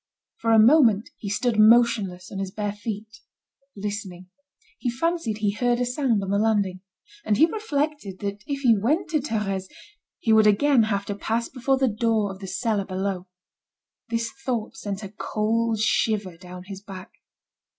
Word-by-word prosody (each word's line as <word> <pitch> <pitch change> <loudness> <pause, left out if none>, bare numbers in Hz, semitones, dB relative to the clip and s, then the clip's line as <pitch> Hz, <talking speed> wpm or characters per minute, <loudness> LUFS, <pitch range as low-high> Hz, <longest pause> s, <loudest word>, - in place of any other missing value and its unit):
For 230 - 0
a 225 - +6
moment 225 -3 +5
he 200 - -5
stood 220 +2 0
motionless 215 -5 +4
on 195 - -5
his 195 -1 -3
bare 205 +1 -3
feet, 215 +1 -7 0.6
listening. 195 -3 -6 0.5
He 250 - -1
fancied 260 -3 -1
he 210 -2 +1
heard 240 +3 0
a 245 - +1
sound 245 -4 0
on 195 - -3
the 200 - +2
landing. 205 -4 +1 0.4
And 210 - +1
he 315 - +7
reflected 300 - -3
that 200 0 -4
if 280 -1 -3
he 240 -4 +5
went 300 - 0
to 310 - +2
Thérèse, 205 -8 -2 0.5
he 225 - +1
would 220 -1 +6
again 235 +3 +4
have 200 -1 -1
to 205 - -3
pass 225 +3 -2
before 265 +1 0
the 265 0 +2
door 220 -2 +1
of 190 - -10
the 195 - -7
cellar 215 -1 -1
below. 190 -1 -3 0.8
This 230 0 -1
thought 240 -4 -2
sent 205 0 -5
a 195 - -6
cold 225 +1 0
shiver 210 -4 +1
down 180 +1 -10
his 195 0 -9
back. 195 0 -10
215 Hz, 170 wpm, -24 LUFS, 200-240 Hz, 0.8 s, he